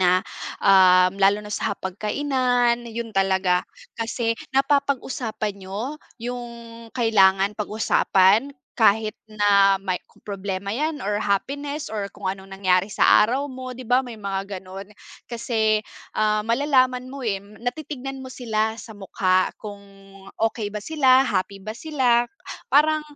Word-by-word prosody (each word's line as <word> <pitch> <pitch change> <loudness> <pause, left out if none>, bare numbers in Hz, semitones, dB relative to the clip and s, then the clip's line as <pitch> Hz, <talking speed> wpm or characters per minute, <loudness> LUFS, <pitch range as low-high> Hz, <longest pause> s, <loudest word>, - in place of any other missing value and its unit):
na, 185 0 +3 0.4
um 185 -1 +6
lalo 200 +2 +3
na 210 - -7
sa - - -2
hapag-kainan, 240 +4 0
yun 230 -1 -6
talaga. 190 -2 +1 0.3
Kasi 230 0 -1 0.2
napapag-usapan 265 -7 -1
niyo 220 +11 -5 0.2
yung 245 0 -5 0.5
kailangan 195 -4 +4
pag-usapan. 210 +3 +2 0.2
Kahit 220 -1 +3
na 205 -2 +4
may 185 -2 -1
kung - - -26
problema 200 -1 -4
yan 295 +4 -2
or 205 +1 -1
happiness 285 +9 -2
or 210 -2 -3
kung 190 -2 -3
anong 190 0 -8
nangyari 185 -1 +2
sa 210 0 +5
araw 275 +5 -2
mo, 255 -1 -7
'di 255 - -9
ba 250 +2 +1
may 240 - -7
mga 195 -2 -4 0.2
gano'n. 190 +1 -9 0.4
Kasi, 220 -2 0 0.3
ah, 215 0 +1
malalaman 255 0 +2
mo 275 -3 -6
eh, 195 -2 -1
natitingnan 265 +5 -6
mo 260 - -9
sila 220 -3 -2
sa 220 0 -10
mukha 185 -2 +1
kung 205 -2 -9 0.6
okey 220 -1 -1
ba 210 - -4
sila, 265 +1 +3
happy 195 -1 -1
ba 215 +3 -7
sila. 245 -5 +1 0.4
Parang, 310 +1 +4
220 Hz, 135 wpm, -23 LUFS, 195-255 Hz, 0.6 s, um